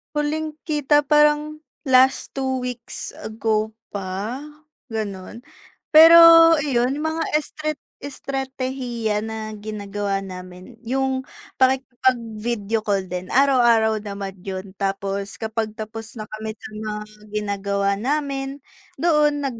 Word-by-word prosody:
Huling 305 +1 -2
kita 295 -1 +2
parang 300 +1 +3 0.2
last 260 0 +4
2 265 -1 -1
weeks 245 -2 -6
ago 220 0 -1 0.2
pa 200 +6 -4 0.5
ganun, 215 +1 -6 0.5
pero 325 +2 +10 0.5
iyon 255 0 +1
mga 315 +2 -2 0.2
estrat 305 0 -4 0.2
estratehiya 260 -5 -3
na 220 0 -5
ginagawa 205 -1 -3
namin 185 +5 -10
yung 265 +2 -1 0.4
pakikipag-video 235 -4 0
call 200 -3 0
din 180 0 -6
araw-araw 235 -5 +4
naman 200 -2 -6
yun 190 -1 -6
tapos 195 0 -2
kapag 220 0 -3
tapos 225 +2 -7
na 215 - -5
kami 215 +1 -7
sa - - -10
mga 215 0 -4 0.3
ginagawa 200 -1 -1
namin 275 +1 -2 0.4
doon 300 -4 +2
nag 255 -4 -3
230 Hz, 105 wpm, -22 LUFS, 210-270 Hz, 0.5 s, pero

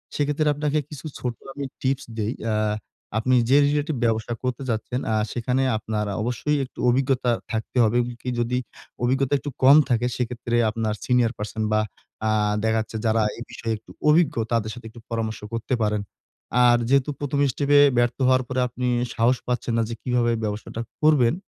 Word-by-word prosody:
সেক্ষেত্রে 145 +1 0
আপনাকে 150 +1 0
কিছু 150 0 -9
ছোট 125 -1 -2 0.2
আমি 140 0 -4 0.2
টিপস 130 0 0
দেই। 110 +2 -1 0.2
আ - - +1 0.6
আপনি 130 +3 +2
যে 135 - +6
রিলেটিভ 150 +1 0
ব্যবসা 115 +1 0
করতে 125 +1 -2
চাচ্ছেন, 115 +2 -2
আ - - +2 0.2
সেখানে 125 +2 0
আপনার 110 0 -2
আ - - -4
অবশ্যই 125 +5 0
একটু 125 - -16
অভিজ্ঞতা 125 -1 +2 0.2
থাকতে 110 +2 -3
হবে। 110 +1 +2
এবং 120 0 -3
কি 125 - -3
যদি 120 +1 0 0.5
অভিজ্ঞতা 135 +2 +1
একটু 145 - -5
কম 140 +3 +9
থাকে, 120 0 +2
সেক্ষেত্রে 120 -1 -2
আপনার 110 -1 -1
সিনিয়র 125 -2 +3
পারসন 105 +1 -4
বা 110 - +4 0.5
আ - - +2 0.3
দেখা 110 0 +2
যাচ্ছে 110 - -6
যারা 110 0 +3 0.2
এই 120 - -6
বিষয়ে 115 -1 -3
একটু 105 - -17 0.2
অভিজ্ঞ 155 -1 +4 0.2
তাদের 110 -2 0
সাথে 120 -1 -11
একটু 115 - -13
পরামর্শ 115 -2 -2
করতে 115 +3 -2
পারেন। 105 -1 0 0.6
আর 120 0 +6
যেহেতু 140 +1 +3
১ম 145 0 -2
স্টেপে 145 +3 +3 0.2
ব্যর্থ 120 0 +2
হওয়ার 130 0 +4
পরে 130 +1 -2
আপনি 125 +1 -3 0.3
সাহস 120 +2 +3
পাচ্ছেন 125 -1 -1
না 115 - +2
যে 115 - -4
কীভাবে 120 -2 +1
ব্যবসাটা 105 +2 -4 0.2
করবেন? 145 -6 +5
120 Hz, 180 wpm, -24 LUFS, 115-135 Hz, 0.6 s, কম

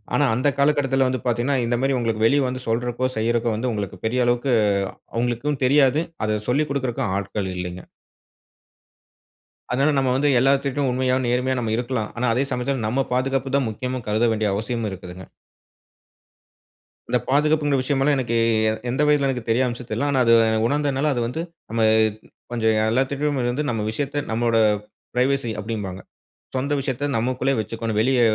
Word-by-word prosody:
ஆனா 145 - +3
அந்த 125 +5 +1
காலகட்டத்தில 140 -2 +2
வந்து 130 0 -1
பார்த்தீங்கன்னா, 120 +3 +1
இந்த 120 +1 0
மாரி 135 +1 +1
உங்களுக்கு 115 -2 0
வெளிய 140 +5 +4
வந்து 130 0 -4
சொல்றக்கோ, 120 +2 0
செய்யறக்கோ, 115 +1 +1
வந்து 125 +3 -1
உங்களுக்கு 105 -3 -4
பெரிய 125 +3 0
அளவுக்கு 120 +2 +1 0.6
அவங்களுக்கும் 120 +4 -1
தெரியாது. 140 +2 +4 0.2
அத 105 0 0
சொல்லிக் 150 +4 +1
குடுக்கறக்கும் 125 -7 -1
ஆட்கள் 100 -1 -3
இல்லைங்க. 90 0 -5 1.9
அதனால 135 +4 +2
நம்ம 135 -1 +2
வந்து 145 +2 +2
எல்லாத்துட்டயும் 135 +1 +1
உண்மையா, 130 0 +1
நேர்மையா 125 +2 0
நம்ம 115 -2 -1
இருக்கலாம். 120 -3 -2
ஆனா 125 +1 +1
அதே 130 +4 +1
சமயத்தில, 125 -1 -1
நம்ம 135 +4 0
பாதுகாப்பு 135 +1 0
தான் 135 -4 0
முக்கியம்னு 125 +3 -4
கருத 110 +3 +2
வேண்டிய 105 -2 0
அவசியமும் 110 +1 -2
இருக்குதுங்க. 90 0 -9 1.8
இந்த - - +2
பாதுகாப்புங்கிற 145 0 +2
விஷயமல்லாம் 140 +1 +1
எனக்கு 120 -3 -1 0.3
எ - - +2 0.2
எந்த 130 +4 0
வயதில 145 -2 +3
எனக்கு 125 -3 -2
தெரிய 120 +3 +3
வந்துச்சுன்னு 120 0 -5
தெர்ல. 145 - 0
ஆனா 135 - +2
அது, 115 - +5 0.3
உணர்ந்தனால, 145 +2 +1
அது 120 - -1
வந்து 140 +7 -4 0.3
நம்ம 115 0 +1 0.7
கொஞ்சம் 110 -2 +1 0.2
எல்லாத்துட்டயும் 140 +3 0
வந்து 145 +5 -2
நம்ம 115 -3 -1
விஷயத்த 145 +4 -2
நம்மோட 115 0 +1 0.6
பிரைவசி 130 -1 +1
அப்படீம்பாங்க. 100 -4 -5 0.6
சொந்த 140 +3 -1
விஷயத்த 135 +1 -3
நமக்குள்ளே 130 +3 0
வச்சுக்கணும். 110 0 -3
வெளிய 130 +2 +2
125 Hz, 150 wpm, -22 LUFS, 115-135 Hz, 1.9 s, அது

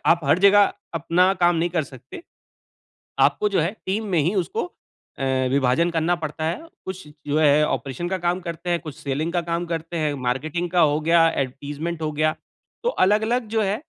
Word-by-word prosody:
आप 170 - +5
हर 145 +5 +3
जगह 200 +1 +6 0.2
अपना 175 +4 +3
काम 175 -1 +4
नहीं 170 +2 0
कर 170 -2 0
सकते, 130 - -12 1.0
आपको 210 - +3
जो 195 -4 +1
है 170 +6 0
टीम 210 +4 -1
में 180 -4 +1
ही 170 +8 +1
उसको 180 -3 -1 0.5
अ, 135 - -2 0.3
विभाजन 140 +5 +2
करना 165 +1 +1
पड़ता 155 -1 -5
है। 175 - -3 0.2
कुछ 190 -3 -6 0.2
जो 145 +1 +1
है 150 0 +5
ऑपरेशन 140 +5 -3
का 190 0 -1
काम 175 +1 0
करते 170 0 -5
हैं, 175 - +2
कुछ 155 -4 -8
सेलिंग 150 +4 -3
का 175 - +1
काम 170 +1 -1
करते 165 +1 -4
हैं, 150 -2 0
मार्केटिंग 155 +8 -2
का 175 0 +2
हो 150 - 0
गया, 165 +1 +4
एडवर्टाइज़मेंट 145 +5 -4
हो 155 - -1
गया। 155 +1 +1 0.5
तो - - +3 0.2
अलग-अलग 220 +4 +1
जो 220 - +3
है 195 0 +1
170 Hz, 195 wpm, -23 LUFS, 150-180 Hz, 1.0 s, जगह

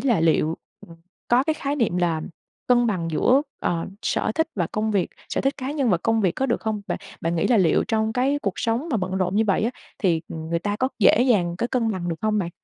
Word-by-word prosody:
là 235 -10 +2
liệu 160 0 +2 0.7
có 245 +2 +4
cái 315 +1 +1
khái 285 -1 -3
niệm 225 -9 +1
là 170 -3 0 0.5
cân 240 -1 +4
bằng 180 -7 -1
giữa, 255 - +3 0.2
ờ, 170 -1 -1 0.2
sở - - 0
thích 320 - +1
và 175 -5 0
công 215 +1 0
việc 195 -4 0 0.2
sở - - -1
thích 270 +2 0
cá 265 0 -4
nhân 275 -7 +1
và 180 - +4
công 225 +4 +1
việc 185 -4 +2
có 270 - -1
được 235 - 0
không? 215 -2 -2
Bạn - - -2 0.2
bạn 165 +1 -1
nghĩ 160 - +1
là 240 - +4
liệu 175 -5 +3
trong 220 0 +1
cái 270 +4 +1
cuộc 200 - 0
sống 235 +8 -1
mà 235 - +2
bận 185 -2 -2
rộn 185 +1 0
như 220 - +3
vậy 195 0 +2
á, 235 - +1 0.3
thì, 170 -5 +2
ừm, 160 0 -6
người 170 - +1
ta 205 +4 -2
có 260 - +1
dễ 220 +2 +5
dàng 195 -9 +2
có 235 - 0
cân 230 -3 +1
bằng 180 -3 -3
được 165 - -2
hông 215 -1 +1
bạn? 175 -4 -2
215 Hz, 255 wpm, -23 LUFS, 175-245 Hz, 0.7 s, dễ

